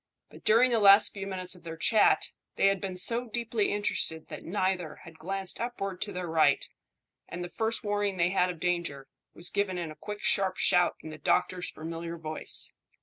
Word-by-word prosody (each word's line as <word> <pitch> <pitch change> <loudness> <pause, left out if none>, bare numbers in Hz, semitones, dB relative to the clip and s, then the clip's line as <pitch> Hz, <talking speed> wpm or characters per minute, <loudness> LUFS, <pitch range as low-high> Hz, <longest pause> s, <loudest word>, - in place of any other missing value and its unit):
But - - -14
during 235 +4 +5
the 230 - +3
last 200 0 +7
few 195 -1 -6
minutes 185 -2 -2
of 180 - -12
their 165 0 -8
chat 215 +6 +3 0.2
they - - +2
had 195 -1 +3
been 190 -2 -4
so 235 +6 +3
deeply 230 -2 -1
interested 180 -6 -2
that - - -7
neither 185 -3 -2
had 160 -1 -14
glanced 195 -1 -3
upward 195 -6 -4
to 205 - -2
their 180 -1 -4
right, 155 -4 +2 0.6
and 175 +1 -5
the 175 - -6
first 225 +6 -1
warning 205 -2 -1
they 170 0 +2
had 185 -1 +2
of 175 -2 -6
danger 170 -6 -2 0.3
was 175 - -5
given 200 -2 -1
in 170 -3 -4
a - - -10
quick 210 +4 -7
sharp 190 -2 +1
shout 180 0 +4
in 155 - -7
the 155 - -10
doctor's 180 -1 0
familiar 165 +1 -6
voice. 155 -1 -2
185 Hz, 200 wpm, -29 LUFS, 170-205 Hz, 0.6 s, last